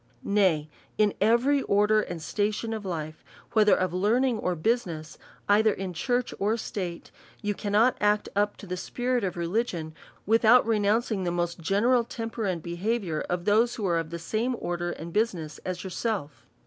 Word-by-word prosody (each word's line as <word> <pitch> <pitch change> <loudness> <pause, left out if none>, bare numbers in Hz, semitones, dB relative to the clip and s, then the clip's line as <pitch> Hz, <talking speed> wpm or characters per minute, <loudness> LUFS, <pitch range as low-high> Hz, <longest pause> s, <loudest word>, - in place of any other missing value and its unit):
Nay, 185 -7 +2 0.3
in 210 -1 +3
every 240 +7 +3
order 210 0 +3
and 175 -4 -5
station 210 +6 -2
of 215 -2 -5
life, 155 -3 -5 0.3
whether 215 -2 +5
of 185 -2 -1
learning 225 +6 +2
or 180 -3 -1
business, 165 -5 -2 0.3
either 215 +2 +5
in 190 -2 -4
church 245 +8 -1
or 210 +3 +1
state^ 185 -6 -5 0.3
you 205 0 0
cannot 210 +5 +2
act 210 0 +2
up 205 0 +1
to - - -10
the 180 -1 -4
spirit 245 +4 -1
of 185 -2 -2
religion, 170 -3 -2 0.3
without 225 +3 +5
re 225 -2 +2
nouncing 210 0 +1
the 175 - 0
most 175 0 -2
general 220 +9 +2
temper 225 -1 -5
and 180 -5 -2
behaviour 175 -1 -2
of 175 0 -2
those 225 +3 +3
who 215 - -3
are 170 -2 +2
of 165 -1 -4
the 170 - -5
same 225 +9 -1
order 175 0 -3
and 170 0 -7
business 180 -9 -1
as 185 -1 -5
your 190 - -6
self. 195 -9 -3
205 Hz, 175 wpm, -27 LUFS, 175-225 Hz, 0.3 s, whether